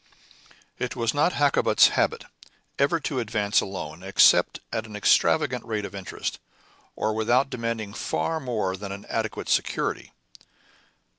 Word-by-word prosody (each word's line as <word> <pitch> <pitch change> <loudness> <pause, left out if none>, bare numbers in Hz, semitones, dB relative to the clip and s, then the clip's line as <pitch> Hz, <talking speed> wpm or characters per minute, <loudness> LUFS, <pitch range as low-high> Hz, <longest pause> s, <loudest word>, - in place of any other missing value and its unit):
It - - -3
was 115 -1 0
not 150 +5 +2
Hakkabut's 145 -1 +4
habit - - 0 0.5
ever 140 +4 +2
to 140 -2 -2
advance 110 -2 +1
a - - -5
loan 90 -4 -7
except 95 +1 +4
at 110 0 -2
an 105 - -10
extravagant 125 +5 +2
rate 110 -3 -3
of - - -8
interest, 95 -2 -5 0.6
or 110 0 -1
without 120 +5 +1
demanding 115 -3 -3
far 160 - -2
more 110 -9 -2
than 100 0 -7
an 100 +1 -8
adequate - - -3
security. - - -1
110 Hz, 140 wpm, -25 LUFS, 100-130 Hz, 0.6 s, Hakkabut's